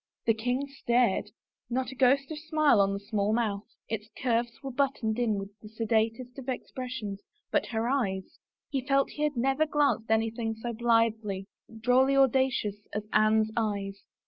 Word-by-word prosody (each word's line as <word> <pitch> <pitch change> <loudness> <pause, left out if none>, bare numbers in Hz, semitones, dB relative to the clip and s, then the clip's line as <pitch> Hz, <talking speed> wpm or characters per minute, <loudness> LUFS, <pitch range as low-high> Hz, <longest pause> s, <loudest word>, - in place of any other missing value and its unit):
The 225 - +4
king 245 +5 -1
stared. 240 -6 +1 0.4
Not 255 +2 -1
a - - -9
ghost 270 +3 +3
of 305 - -4
a 320 - -17
smile 305 -9 +5
on 195 0 +2
that 200 0 -5
small 210 0 0
mouth; 215 -3 -1 0.2
its 220 -1 -4
curves 240 -1 +1
were 270 - -4
buttoned 245 -4 0
in 230 -3 +2
with 195 0 -5
the 215 - -12
sedatest 225 +3 -1
of 265 0 -7
expressions 250 -5 -5 0.3
but - - +1
her 225 0 -1
eyes 200 -8 -1
— - - -65
he 270 -2 0
felt 275 +1 +2
he 300 - -7
had 300 -3 0
never 270 +5 +2
glimpsed 285 -6 +1
anything 225 0 0
so 235 +2 -5
blithely, 225 -4 +1 0.4
drolly 260 +3 +4
audacious, 260 -6 +2 0.2
as 210 0 -3
Anne's 215 0 +4
eyes. 200 -3 -2
235 Hz, 170 wpm, -29 LUFS, 215-265 Hz, 0.4 s, smile